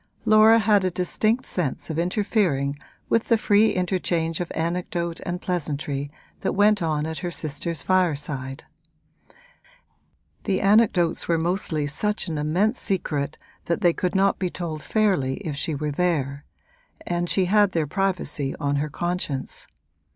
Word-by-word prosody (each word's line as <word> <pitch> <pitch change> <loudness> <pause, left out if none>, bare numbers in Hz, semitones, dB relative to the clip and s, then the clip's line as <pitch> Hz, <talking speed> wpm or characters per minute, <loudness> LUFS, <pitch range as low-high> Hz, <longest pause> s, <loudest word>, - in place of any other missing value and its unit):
Laura 215 +1 +7
had 210 -2 +3
a 185 - +2
distinct 215 +7 0
sense 165 -2 -2
of 160 - -2
interfering 175 -7 0 0.3
with 230 - +2
the 230 - +3
free 215 0 +4
interchange 175 -3 -1
of 175 - -4
anecdote 170 0 -2
and 175 +1 -3
pleasantry 145 -5 -2 0.3
that - - -1
went 205 0 +4
on 155 -2 0
at 160 0 -4
her 175 - -3
sister's 165 0 -2
fireside: 145 -7 -1 1.8
the 190 -2 +1
anecdotes 200 -5 +3
were 170 - +2
mostly 165 -3 0
such 210 +9 -1
an 160 -3 -3
immense 185 - +1
secret 155 -6 -2 0.3
that 170 +4 -1
they 175 -3 +4
could 180 +2 -2
not 195 +1 +3
be 185 - 0
told 165 -3 -5
fairly 185 -13 +1
if 150 -3 -3
she 150 +2 -1
were 150 +1 -2
there, 145 -4 -1 0.6
and 175 0 -1
she 190 - +3
had 205 0 +3
their 165 -2 +1
privacy 175 -5 -1
on 145 0 0
her 150 +2 -1
conscience. 175 -4 -3
175 Hz, 145 wpm, -24 LUFS, 150-195 Hz, 1.8 s, Laura